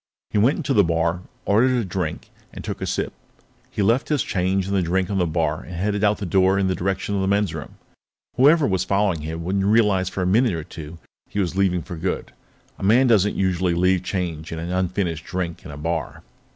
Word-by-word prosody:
He 105 - +1
went 125 +8 +3
into 140 - -1
the 105 - +5
bar, 85 +1 0 0.2
ordered 125 +5 +3
a 115 - -1
drink, 90 -4 -4 0.2
and - - -9
took - - -5
a - - -2
sip. - - -2 0.6
He 105 - -1
left 115 +7 +2
his 150 -3 +2
change 95 0 0
and 100 +1 -1
the 95 - +3
drink 90 +2 0
on 100 - 0
the 90 - +2
bar 80 -1 -1
and 90 - -9
headed 100 +4 -1
out 105 0 +3
the 100 - -4
door 95 +2 +3
in 100 - +2
the 95 - +1
direction 95 +2 -2
of 100 - 0
the 95 - 0
men's 100 -3 +1
room. 80 -3 -7 0.6
Whoever 145 +4 +5
was 95 -5 +1
following 100 -3 +1
him 80 +2 -5
wouldn't 95 +3 0
realize 100 -3 +3
for 95 0 -3
a - - 0
minute 110 +4 +3
or 80 -2 -3
two 80 -2 -9 0.3
that - - -31
he 105 - -1
was 90 -3 -1
leaving 90 -3 +1
for 90 -4 -7
good. 90 +3 -3 0.5
A - - -7
man 115 +7 +5
doesn't 105 -4 +3
usually 90 -2 +1
leave 90 +1 +3
change 90 -4 -4
and 80 - -4
an 85 +2 -4
unfinished 90 -3 -1
drink 90 -2 -4
in 90 - -10
a 70 - -8
bar. 80 +1 -3
95 Hz, 230 wpm, -23 LUFS, 85-100 Hz, 0.6 s, the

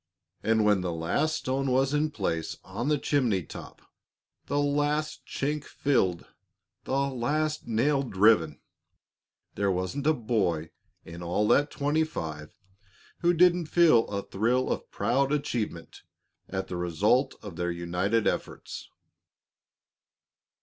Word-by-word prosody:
And 110 -1 +2
when 105 -3 +4
the 90 -1 -2
last 90 - 0
stone 135 -1 -1
was 135 +2 +2
in 150 +1 +2
place 85 - -3
on 105 +7 -4
the 150 0 +3
chimney 125 - +1
top, - - -11 0.6
the 145 - -1
last 145 +1 0
chink 145 +1 -2
filled, 95 -15 0 0.6
the - - -6
last 145 +4 -1
nail 135 +5 +2
driven, 95 - +3 0.9
there 100 -1 0
wasn't 95 +11 -2
a 155 - +5
boy 95 - -1 0.3
in 85 +1 -9
all 90 +5 0
that 145 +1 +4
twenty 145 +3 +1
five 80 - -5 0.7
who 175 0 +3
didn't 175 -1 +4
feel 155 -9 +5
a 100 -1 -3
thrill 120 +6 0
of - - -3
proud 135 +3 +1
achievement 120 - -3 0.5
at 95 0 -3
the 90 - -4
result 95 - +1
of 100 -5 -8
their 90 0 -2
united 90 +6 0
efforts. - - -3
115 Hz, 130 wpm, -28 LUFS, 90-145 Hz, 0.9 s, a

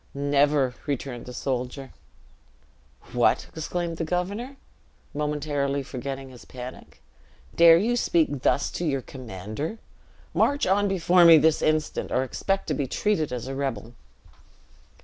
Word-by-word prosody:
"Never," 140 -1 +2
returned 135 -3 -4
the - - -6
soldier. 130 +1 -4 1.2
"What!" - - +2
exclaimed 170 +1 -3
the 165 - -2
governor, 200 - -3 0.6
momentarily 145 -2 -1
forgetting 135 +1 -6
his 125 -2 -13
panic, 125 0 -10 0.5
"dare 165 -1 +8
you 225 +7 +1
speak 160 - +1
thus 140 - +1
to - - -4
your 135 -5 -1
commander? 120 - -6 0.6
March 285 +1 +2
on 200 +2 +2
before 180 -2 +4
me 165 -1 +9
this 160 +1 +3
instant, 155 0 0
or 130 - +2
expect 195 +8 -2
to - - +1
be 140 -1 -2
treated 165 -2 0
as 125 -1 -4
a 135 - -4
rebel." 120 -5 -4
145 Hz, 130 wpm, -25 LUFS, 130-170 Hz, 1.2 s, me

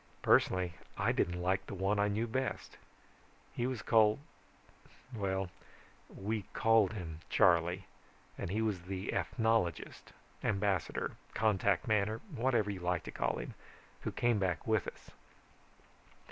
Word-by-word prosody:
Personally 90 -2 +3 0.2
I - - +2
didn't 90 0 0
like 95 +2 0
the - - -5
one 95 +2 +1
I 105 - +3
knew 105 +3 0
best. 130 +3 -3 0.8
He 120 - -1
was 130 -5 -3
called 110 -2 +5 1.0
well, 95 -4 -1 0.6
we 105 +2 -3
called 110 -3 +4
him 85 -6 -6
Charley, 90 -1 +3 0.5
and - - -4
he 110 +4 0
was 105 -5 -1
the 95 +2 -4
ethnologist, 110 - 0 0.3
ambassador, 100 -4 0 0.2
contact 100 -3 +2
man, 105 -2 +3
or 110 - -3 0.2
whatever 115 -4 +2
you 95 - -5
like 90 -2 -1
to - - -7
call - - -1
him, - - -6 0.5
who - - -3
came 120 -3 +2
back 90 -4 -1
with 110 -3 +1
us. - - -9
100 Hz, 135 wpm, -34 LUFS, 90-110 Hz, 1.0 s, called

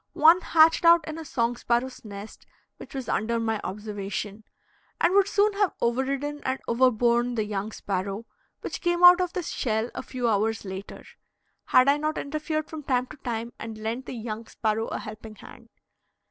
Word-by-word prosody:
One 330 +4 +6
hatched 325 -1 +4
out 335 -1 +6
in 315 +1 -5
a - - -6
song 240 -5 -1
sparrow's 245 +2 -1
nest 205 0 -10 0.3
which - - -11
was 265 -2 -4
under 230 +2 0
my 225 -2 -1
observation, 205 +1 -5 0.6
and 345 - +3
would 400 0 +5
soon 410 +1 +2
have 400 -1 +1
overridden 275 +4 -1
and 260 +1 -1
overborne 240 0 +2
the 220 - 0
young 205 0 -3
sparrow, 195 +2 -3 0.4
which - - -5
came 345 -1 0
out 355 +1 +9
of 360 -1 -2
the 365 - -2
shell 225 -5 -2
a - - -4
few 255 -2 -3
hours 220 0 0
later, 190 +1 -8 0.6
had 255 +1 +5
I 280 +1 +5
not 305 +1 -2
interfered 310 +1 -3
from 315 -1 -7
time 255 -3 0
to 305 - -10
time 235 -2 -4
and 225 -1 -7
lent 225 +4 -4
the - - -5
young 225 -1 -6
sparrow 220 0 -1
a - - -3
helping 215 0 -9
hand. - - -14
240 Hz, 180 wpm, -26 LUFS, 220-305 Hz, 0.6 s, out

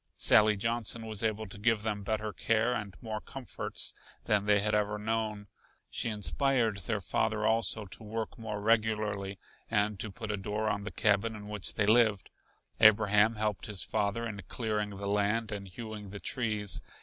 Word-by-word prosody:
Sally 105 0 +6
Johnson 115 +1 -1
was 110 -1 -3
able 110 0 0
to 100 0 -9
give 110 0 +2
them 105 -2 -2
better 110 +1 -2
care 115 +5 +1
and 100 -7 -5
more 110 -1 -4
comforts 135 -3 -4 0.3
than 105 -1 +1
they 105 0 +5
had 105 +1 0
ever 105 0 +1
known. 110 -1 -2 0.5
She - - 0
inspired 115 +1 +1
their 85 - -1
father 110 -1 0
also 110 -1 +2
to 95 - -9
work 110 +1 -4
more 110 -2 -5
regularly 105 -3 +1 0.3
and 105 -2 +1
to 110 - -2
put 110 +1 -5
a 105 - -1
door 105 +2 -2
on 100 -1 -2
the 110 - -4
cabin 110 +1 +2
in 105 -1 -9
which 105 -2 -3
they 100 - +2
lived. 110 -2 +3 0.5
Abraham 110 +1 +6
helped 105 -2 -1
his 105 -3 +1
father 110 +2 -1
in 105 -3 -5
clearing 105 -3 -1
the 100 0 -7
land 105 +3 +1
and 100 -2 -5
hewing 105 +1 -8
the 100 +1 -7
trees. 105 -5 0
105 Hz, 175 wpm, -31 LUFS, 105-110 Hz, 0.5 s, Sally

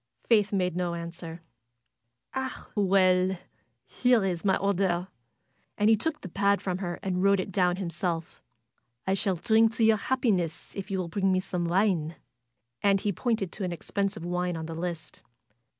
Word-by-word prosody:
Faith 210 -3 +3
made 180 -3 0
no 175 -1 -1
answer. 170 0 -7 0.9
"Ah, 265 0 -4
well! 185 -2 +3 0.5
Here's 195 - +1
my 195 -2 +3
order!" 190 -2 0 0.7
And 210 +1 +4
he - - +7
took 300 +8 -2
the - - -7
pad 200 +2 +2
from 185 -1 -3
her 175 -3 -3
and 185 -2 -1
wrote 200 0 +4
it 185 - -3
down 180 -1 +2
himself. 170 -2 -3 0.6
"I 190 - +1
shall 195 -1 +1
drink 220 +4 +3
to 230 - +1
your 220 -1 +5
happiness 200 -9 -1
if 195 - -5
you 195 - -1
will 185 -2 -2
bring 195 +2 +1
me 185 - +3
some 180 -2 -3
wine." 170 -3 +1 0.7
And 195 -1 +4
he 205 - 0
pointed 210 -3 -1
to 205 - -5
an 180 - -1
expensive 195 +1 -3
wine 180 0 -1
on 160 - -5
the 165 - -6
list. 165 -1 -5
190 Hz, 165 wpm, -28 LUFS, 175-200 Hz, 0.9 s, he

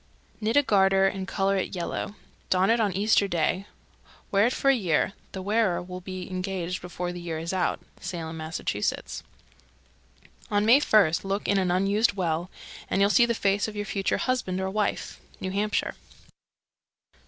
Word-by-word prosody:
Knit 225 +4 +1
a 290 - +6
garter 195 -4 +4
and 195 0 -3
color 195 0 +1
it 190 - -2
yellow. 180 +3 -3 0.3
Don 190 +3 +3
it 235 - +3
on 210 -3 +2
Easter 200 +2 +3
Day. 185 +2 0 0.6
Wear 200 +3 +4
it - - 0
for 275 - +1
a - - +3
year. 190 -4 +1 0.2
The 190 - -5
wearer 210 -2 +2
will 180 +1 -7
be 185 0 -6
engaged 185 -1 -3
before 180 0 -4
the 175 - -7
year 165 -2 -4
is 165 +3 -4
out. 185 -2 0 0.2
Salem, 165 -3 -5
Mass. 160 +1 -4
322. - - -2 1.3
On 205 -1 +2
May 240 +5 +7
first 205 - +3
look 195 +1 -2
in 200 0 +3
an 185 -2 +1
unused 195 +5 +2
well, 175 -2 -1 0.4
and - - +1
you'll 200 +1 +4
see 240 +1 +5
the 235 - 0
face 200 0 +1
of 215 - -7
your 205 0 -3
future 195 -2 -1
husband 245 -8 -1
or 190 0 -2
wife. 210 0 -2 0.2
_New 185 0 -4
Hampshire. 210 +1 0
195 Hz, 175 wpm, -26 LUFS, 180-205 Hz, 1.3 s, May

